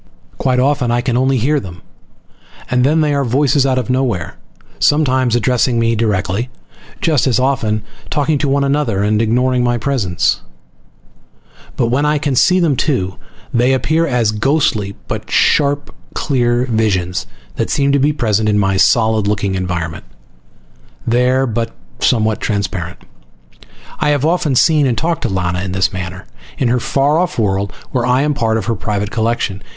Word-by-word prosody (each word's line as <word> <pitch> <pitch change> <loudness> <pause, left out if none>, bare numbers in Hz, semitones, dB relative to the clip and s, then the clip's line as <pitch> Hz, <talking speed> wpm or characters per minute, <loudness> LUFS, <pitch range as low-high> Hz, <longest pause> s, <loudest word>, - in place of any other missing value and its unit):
Quite 130 -1 +1
often 130 -2 +1
I 120 +1 +1
can 120 -1 -1
only 130 +1 +2
hear 145 +6 +1
them, 90 -6 -10 0.9
and 125 0 +2
then 155 +4 +3
they 150 -1 +1
are 140 -1 +1
voices 135 +2 +2
out 130 -1 +1
of 125 - -1
nowhere, 125 -10 -1 0.4
sometimes 130 -5 +2
addressing 125 0 +1
me 115 0 +2
directly, 105 +1 -1 0.5
just 150 -6 +2
as 130 -1 +2
often 125 -6 0 0.3
talking 145 0 0
to 145 - 0
one 140 +1 +2
another 140 -8 0
and 105 +1 +1
ignoring 125 +2 +1
my 120 0 +1
presence. 115 -9 0 1.4
But 120 -3 +1
when 130 +4 +1
I 150 0 +2
can 145 -2 -1
see 180 +8 +4
them 165 -6 +2
too, 120 - -1 0.4
they 125 +2 +3
appear 160 +5 +1
as 120 -5 +1
ghostly 110 -4 0
but - - -5
sharply 145 0 +2 0.2
clear 120 -3 +1
visions 95 - -1 0.3
that - - -1
seem 140 0 +1
to 140 - +2
be 145 +3 +3
present 110 -6 0
in 105 - +2
my 95 -1 +1
solid 110 0 +3
looking 100 -1 -1
environment. 90 -4 -3 1.0
There, 125 +3 +2
but 115 -1 -3 0.3
somewhat 110 -3 +1
transparent. 95 -4 -3 1.0
I 150 - +1
have 145 -1 +1
often 165 -4 +1
seen 150 +1 +4
and 120 -3 0
talked 165 +2 -1
to 120 - -1
Lana 90 -2 -1
in 95 -1 -4
this 95 +3 +1
manner, 95 +1 -6 0.3
in 130 - +1
her 125 +1 +2
far 140 +6 +1
off 180 0 -1
world, 100 -3 0 0.2
where 125 -3 0
I 125 +2 +3
am 150 0 +1
part 115 -5 0
of 110 - -3
her 115 - 0
private 105 -1 -3
collection. 110 -3 -1
120 Hz, 165 wpm, -16 LUFS, 105-140 Hz, 1.4 s, see